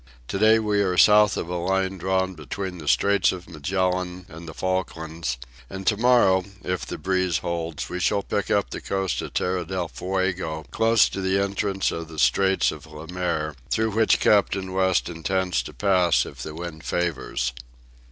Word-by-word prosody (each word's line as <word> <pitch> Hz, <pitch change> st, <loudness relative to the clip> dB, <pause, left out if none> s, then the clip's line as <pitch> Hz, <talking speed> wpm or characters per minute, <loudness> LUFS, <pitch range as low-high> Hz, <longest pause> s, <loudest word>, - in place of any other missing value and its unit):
To 95 Hz, -, -2 dB
day 110 Hz, +1 st, +6 dB
we 105 Hz, -2 st, +1 dB
are 90 Hz, -2 st, 0 dB
south 105 Hz, +1 st, +6 dB
of -, -, -3 dB
a 90 Hz, -, -4 dB
line 95 Hz, +2 st, -1 dB
drawn 95 Hz, +1 st, 0 dB
between 90 Hz, +4 st, -6 dB
the 75 Hz, -, -9 dB
Straits 100 Hz, +4 st, +3 dB
of 90 Hz, -1 st, -8 dB
Magellan 90 Hz, +2 st, -2 dB
and 85 Hz, 0 st, -10 dB
the 80 Hz, -, -7 dB
Falklands, 85 Hz, -6 st, -3 dB, 0.3 s
and 95 Hz, 0 st, -7 dB
to 105 Hz, -, +3 dB
morrow, 110 Hz, -5 st, +4 dB, 0.2 s
if 90 Hz, -8 st, -3 dB
the -, -, -5 dB
breeze 95 Hz, -3 st, 0 dB
holds, 85 Hz, -2 st, -4 dB
we 90 Hz, -, -4 dB
shall 100 Hz, +2 st, +1 dB
pick -, -, -2 dB
up -, -, +1 dB
the -, -, -5 dB
coast 95 Hz, -2 st, -1 dB
of -, -, -8 dB
Tierra 90 Hz, 0 st, 0 dB
del 90 Hz, 0 st, -3 dB
Fuego 90 Hz, -3 st, -2 dB
close 115 Hz, -1 st, +4 dB
to 95 Hz, -, -5 dB
the 95 Hz, +1 st, +1 dB
entrance 100 Hz, -1 st, 0 dB
of 85 Hz, 0 st, -5 dB
the 80 Hz, -1 st, -11 dB
Straits 95 Hz, +5 st, +3 dB
of -, -, -10 dB
Le 80 Hz, +3 st, -10 dB
Maire, 85 Hz, -4 st, -1 dB, 0.2 s
through 110 Hz, 0 st, +1 dB
which 110 Hz, +1 st, +3 dB
Captain 95 Hz, -2 st, +2 dB
West 95 Hz, -1 st, +2 dB
intends 90 Hz, +1 st, -1 dB
to -, -, -9 dB
pass 90 Hz, -10 st, +2 dB
if -, -, -10 dB
the 75 Hz, -, -6 dB
wind 80 Hz, -2 st, -7 dB
favours. 65 Hz, -4 st, -2 dB
95 Hz, 180 wpm, -24 LUFS, 85-95 Hz, 0.3 s, day